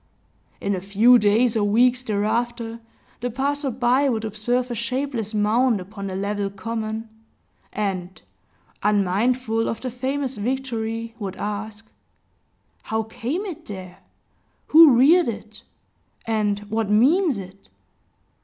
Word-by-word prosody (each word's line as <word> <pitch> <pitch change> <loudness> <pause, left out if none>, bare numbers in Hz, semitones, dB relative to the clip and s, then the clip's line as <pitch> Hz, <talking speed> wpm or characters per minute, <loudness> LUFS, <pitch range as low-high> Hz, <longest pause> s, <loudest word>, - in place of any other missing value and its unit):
In 200 - -1
a 185 - -3
few 215 +6 +5
days 220 +3 +3
or 215 - +2
weeks 245 +5 +3
thereafter, 230 +1 -2 0.4
the 245 - -2
passer 280 +3 -1
by 255 +3 +2
would 225 -3 -1
observe 240 +4 -1
a - - -1
shapeless 235 -1 -3
mound 220 +2 +2
upon 200 +2 -7
the 190 - -5
level 200 +1 -2
common; 220 +2 -4 0.6
and, 190 -3 -3 0.6
unmindful 220 +4 +1
of 225 - -3
the 255 - -4
famous 265 +1 -3
victory, 230 -1 -3
would 195 -3 -5
ask, 210 +1 -5 1.0
"How 220 0 -2
came 245 - -4
it 360 -7 -8
there? 185 -2 -8 0.7
Who 310 -5 +8
reared 325 +8 +5
it? 215 -1 -8 0.6
And 215 -3 0
what 215 0 -2
means 275 - +3
it?" 195 0 -11
225 Hz, 125 wpm, -23 LUFS, 205-250 Hz, 1.0 s, Who